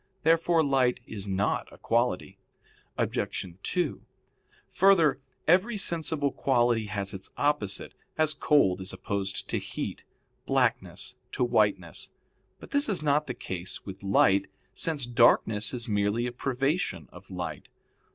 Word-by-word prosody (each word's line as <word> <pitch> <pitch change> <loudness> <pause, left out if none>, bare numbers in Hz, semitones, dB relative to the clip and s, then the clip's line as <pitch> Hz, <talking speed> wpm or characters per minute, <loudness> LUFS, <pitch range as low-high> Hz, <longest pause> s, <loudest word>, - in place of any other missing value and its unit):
Therefore 165 +1 +4
light 130 -4 +2
is 100 -2 -7
not 95 +1 0
a - - -14
quality. 115 -5 0 0.6
Obj. - - -1 0.2
2: 175 - -1 0.7
Further, 165 -8 +4 0.3
every 190 +7 +4
sensible 160 -6 0
quality 120 -5 +2
has 100 -1 -3
its 95 -1 -6
opposite, 145 -10 0 0.2
as 155 -1 +2
cold 140 -11 +3
is 95 - -4
opposed 100 +1 -3
to - - 0
heat, - - -5 0.4
blackness - - 0 0.2
to - - 0
whiteness. 105 -8 +1 0.5
But - - -12
this 285 -3 +2
is 190 -7 -1
not 150 +1 +2
the 125 - -4
case 90 0 -5
with 95 -1 -8
light 100 0 +3 0.3
since 150 -6 -1
darkness 115 -3 +3
is 120 -2 -4
merely 105 +2 +1
a 125 - -2
privation 135 +7 -1
of - - -14
light. - - -5
125 Hz, 130 wpm, -28 LUFS, 100-150 Hz, 0.7 s, Therefore